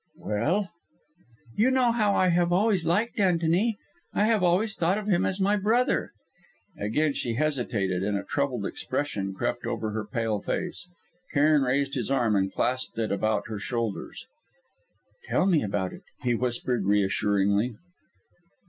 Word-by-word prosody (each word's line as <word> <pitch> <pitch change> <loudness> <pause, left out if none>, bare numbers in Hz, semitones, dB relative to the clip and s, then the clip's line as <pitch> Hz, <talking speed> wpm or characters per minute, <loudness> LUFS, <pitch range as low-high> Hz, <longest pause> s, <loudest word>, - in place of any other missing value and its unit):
"Well?" 175 - -1 0.8
"You 225 +5 +4
know 260 -2 +3
how 215 -4 +2
I 185 - +3
have 175 0 +2
always 190 -2 +2
liked 210 +7 +1
Antony? 180 +4 +2 0.4
I - - +3
have 220 -1 +3
always 190 +5 +2
thought 175 +4 +1
of 210 - -4
him 190 -4 +2
as 190 - -1
my 200 +2 +2
brother." 225 +5 +1 0.7
Again 145 +7 0
she 120 -4 -2
hesitated, 115 -10 -1
and 100 +1 0
a 100 - -4
troubled 130 -5 -1
expression 105 -9 -3
crept - - -2
over 110 -1 -3
her 110 0 -3
pale 110 -1 -1
face. 180 0 -3 0.4
Cairn 150 0 +4
raised 135 +1 0
his 125 -3 -2
arm 120 -6 +2
and 95 -1 +1
clasped 130 -1 -1
it 115 -1 -1
about 105 +1 0
her 110 -2 -5
shoulders. 115 -1 -4 1.0
"Tell - - +1
me 180 -5 +4
all - - -2
about 100 -2 -2
it," - - -11 0.2
he 125 -1 +2
whispered 120 -1 -1
reassuringly. 100 +2 +2
140 Hz, 155 wpm, -27 LUFS, -, 1.0 s, You